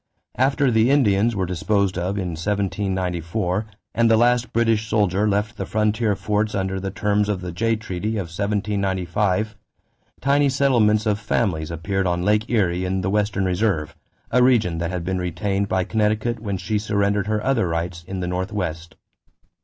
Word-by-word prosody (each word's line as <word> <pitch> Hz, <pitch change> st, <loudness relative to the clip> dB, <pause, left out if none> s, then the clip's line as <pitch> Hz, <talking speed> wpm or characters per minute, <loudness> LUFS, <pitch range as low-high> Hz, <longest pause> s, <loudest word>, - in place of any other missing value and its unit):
After 135 Hz, +1 st, +3 dB
the 110 Hz, +2 st, +3 dB
Indians 115 Hz, -5 st, +3 dB
were 95 Hz, -2 st, 0 dB
disposed 95 Hz, +2 st, 0 dB
of 95 Hz, +3 st, -2 dB
in 90 Hz, -3 st, -2 dB
1794 95 Hz, +1 st, -2 dB, 0.3 s
and 115 Hz, 0 st, +3 dB
the 110 Hz, -, +5 dB
last 120 Hz, +1 st, +2 dB
British 115 Hz, -2 st, +1 dB
soldier 105 Hz, -1 st, +2 dB
left 105 Hz, +1 st, -1 dB
the -, -, -3 dB
frontier 105 Hz, 0 st, +1 dB
forts 105 Hz, +2 st, -1 dB
under 95 Hz, 0 st, -1 dB
the 95 Hz, +1 st, -3 dB
terms 105 Hz, +1 st, 0 dB
of 100 Hz, -3 st, -1 dB
the 90 Hz, -1 st, -5 dB
Jay 115 Hz, +6 st, 0 dB
treaty 110 Hz, -1 st, -4 dB
of 100 Hz, -, -1 dB
1795, 100 Hz, 0 st, -1 dB, 0.6 s
tiny 140 Hz, +1 st, +3 dB
settlements 120 Hz, -6 st, +3 dB
of 105 Hz, -1 st, +1 dB
families 95 Hz, -7 st, -1 dB
appeared 95 Hz, +4 st, -2 dB
on 90 Hz, 0 st, 0 dB
Lake 105 Hz, +2 st, +1 dB
Erie 95 Hz, -6 st, +1 dB
in 95 Hz, +1 st, -1 dB
the 95 Hz, +1 st, -1 dB
"Western 105 Hz, -2 st, 0 dB
Reserve," 90 Hz, -4 st, 0 dB, 0.4 s
a 125 Hz, -, +4 dB
region 110 Hz, -10 st, +3 dB
that 85 Hz, 0 st, -2 dB
had 90 Hz, -1 st, -3 dB
been 95 Hz, +1 st, -2 dB
retained 95 Hz, +3 st, -1 dB
by 95 Hz, -1 st, +1 dB
Connecticut 110 Hz, +3 st, 0 dB
when 100 Hz, -3 st, -3 dB
she 95 Hz, +4 st, -1 dB
surrendered 100 Hz, -1 st, 0 dB
her 105 Hz, 0 st, -1 dB
other 130 Hz, -8 st, +2 dB
rights 85 Hz, +1 st, -3 dB
in 95 Hz, -1 st, -4 dB
the 90 Hz, -, -2 dB
Northwest. 90 Hz, -3 st, -3 dB
100 Hz, 170 wpm, -22 LUFS, 90-110 Hz, 0.6 s, the